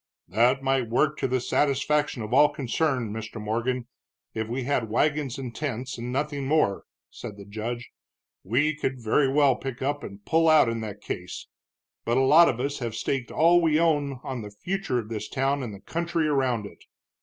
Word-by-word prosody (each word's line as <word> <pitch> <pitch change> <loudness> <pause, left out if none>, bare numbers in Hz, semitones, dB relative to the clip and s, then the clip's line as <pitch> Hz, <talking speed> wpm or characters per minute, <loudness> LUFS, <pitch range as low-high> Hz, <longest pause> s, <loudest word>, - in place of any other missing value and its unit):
"That 120 +8 +2
might 135 -3 +1
work 150 +5 +1
to - - 0
the 130 0 0
satisfaction 145 0 +1
of 105 +3 -5
all 145 +2 +6
concerned, 130 -4 -1
Mr. 110 0 -6
Morgan, 120 +4 -2 0.5
if 110 0 -3
we 125 +3 -3
had 125 -4 -1
wagons 145 +2 0
and 130 -3 -6
tents, 130 -3 -3
and 120 +1 -4
nothing 140 0 -2
more," 145 -10 +1 0.3
said 105 - -8
the 100 - -10
judge. 115 +4 -5 0.5
"We 140 +10 +2
could 130 -3 -3
very 130 +4 +2
well 140 -2 +4
pick 130 0 -6
up 145 +2 -1
and 100 +1 -10
pull 165 0 +3
out 155 -6 +6
in 115 0 -3
that 105 -2 -7
case. 90 -2 -6 0.6
But 120 +2 +1
a - - +4
lot 155 +6 +7
of 120 - -2
us 140 +3 -2
have 115 -4 -4
staked 130 -3 -2
all 170 +2 +4
we 160 -2 +3
own 145 -5 +1
on 130 -3 -4
the 105 - -7
future 175 - -3
of 110 -3 -4
this 110 -2 -5
town 135 +1 0
and 120 -4 -5
the 100 - -9
country 170 - -1
around 130 -7 +1
it. - - -12
130 Hz, 195 wpm, -26 LUFS, 115-145 Hz, 0.6 s, lot